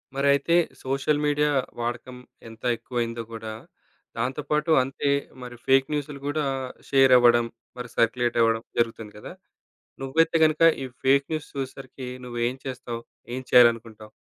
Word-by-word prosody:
మరైతే 140 +4 +2 0.3
social 135 +3 0
media 150 0 +2 0.3
వాడకం 120 +1 -4 0.3
ఎంత 115 0 -15
ఎక్కువయిందో 115 0 -3
గూడా, 110 -1 -6 0.6
దాంతోపాటు 150 +6 -1
అంతే 135 +2 -2 0.3
మరి 125 0 -8
ఫేక్ 135 0 +4
న్యూసులు 145 -1 -4
గూడా 145 +1 -1 0.4
షేరవ్వడం, 125 -3 +5 0.3
మరి 125 -1 -6
సర్క్యులేటవ్వడం, 115 -1 +2 0.2
జరుగుతుంది 115 -2 -2
గదా! 105 - -9 0.7
నువ్వైతే 160 +5 +2
గనుక 155 0 0 0.2
ఈ - - -3 0.2
ఫేక్ 140 +1 +4
న్యూస్ 155 -1 -3
చూసేసరికి 135 -1 -6 0.2
నువ్వేం 120 0 -2
చేస్తావు? 125 -3 -5 0.3
ఏం 130 - -3
చేయాలనుకుంటావు? 115 -3 +4
130 Hz, 120 wpm, -25 LUFS, 115-140 Hz, 0.7 s, షేరవ్వడం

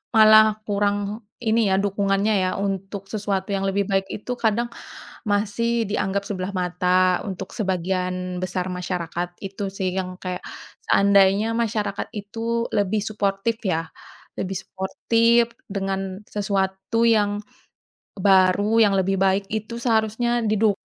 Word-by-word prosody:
malah 215 0 +8 0.2
kurang 205 +1 -1 0.2
ini, 225 -2 +1
ya, 190 - +3
dukungannya 200 +1 +1
ya. 185 - +1
Untuk 195 0 -3
sesuatu 200 -2 -2
yang 195 0 -1
lebih 200 +1 0
baik 195 0 +2
itu 215 - -6
kadang, 235 -1 +1 0.7
masih 230 +3 +1
dianggap 200 -1 -1
sebelah 190 -2 -3
mata, 180 +1 +2
untuk 190 - -6
sebagian 185 -2 -2
besar 185 0 -2
masyarakat. 175 -1 -3 0.2
Itu 195 +1 -4
sih, 190 -1 -3
yang 185 -1 -3
kayak, 180 -1 -5 0.5
seandainya 200 +2 +4
masyarakat 215 -3 -1
itu 230 +3 -2
lebih 205 +1 +1
suportif 210 +2 -1
ya. 165 -6 -1 0.5
Lebih 190 0 -2
suportif 230 +5 +1 0.2
dengan 195 0 -3
sesuatu 200 +2 -1
yang 205 -3 +3 0.8
baru, 195 +2 +3
yang 200 - +2
lebih 195 +1 +1
baik 195 +1 +2
itu 220 +2 -4
seharusnya 235 +1 +1
diduk 215 -1 +2
200 Hz, 125 wpm, -23 LUFS, 190-215 Hz, 0.8 s, malah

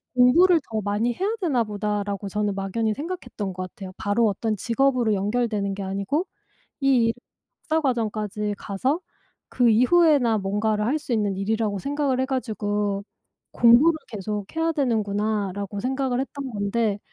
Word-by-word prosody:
'공부를 330 +8 +6
더 215 -1 -1
많이 205 +4 0
해야 390 - -1
되나 275 -10 +2
보다.'라고 205 -1 -3
저는 210 0 -1
막연히 210 +3 -1
생각했던 290 - -5
것 185 0 -5
같아요. 195 -3 -9
바로 215 +2 +2
어떤 215 +2 -1
직업으로 245 0 +1
연결되는 205 -1 -1
게 200 - -5
아니고 200 - -1 0.6
이 260 -4 +4
일을 230 - +1 0.5
박사 320 +1 +2
과정까지 215 -5 -1
가서 255 - -1 0.5
그 245 -2 +3
이후에나 255 -1 +4
뭔가를 210 +2 0
할 295 +5 +1
수 280 -5 -6
있는 205 -3 +1
일이라고 210 0 -1
생각을 280 0 -1
해 260 - +1
가지고 205 -6 -2 0.5
'공부를 250 +8 +6
계속해야 210 - -2
되는구나.'라고 205 - -1
생각을 260 0 -1
했던 275 0 -5
건데 205 0 0
220 Hz, 340 characters per minute, -24 LUFS, 205-260 Hz, 0.6 s, 공부를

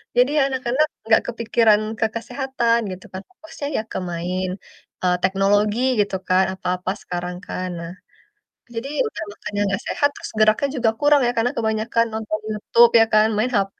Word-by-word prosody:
Jadi, 250 +2 +4
ya - - +5
anak-anak 260 +2 +1 0.2
nggak 220 - +5
kepikiran 230 -2 +3 0.2
ke - - +3
kesehatan, 240 -1 0
gitu 185 +2 -9
kan, 190 - -5
fokusnya 320 -5 -8
ya - - +1
ke - - -3
main, 180 +2 -2 0.6
eee, 180 -1 +3
teknologi 205 +3 +2 0.2
gitu 200 -1 +1
kan, 185 +1 +4
apa-apa 180 0 -2
sekarang 175 0 -5
kan. 185 0 -4
Nah, 170 0 -7 0.8
jadi, 230 +4 -4 0.2
udah 435 - -7
makannya 205 0 -5
nggak 195 0 -1
sehat, 285 - +2
terus - - -8
geraknya 215 +6 +4
juga 240 -4 +2
kurang 290 -1 +4
ya, 240 - +2
karena 235 +2 +2
kebanyakan 220 +1 +1
nonton 215 -1 -3
Youtube 230 +2 +4
ya 225 - +6
kan, 215 0 +6
main 230 +4 +1
HP. 195 -1 0
220 Hz, 170 wpm, -21 LUFS, 195-240 Hz, 0.8 s, ya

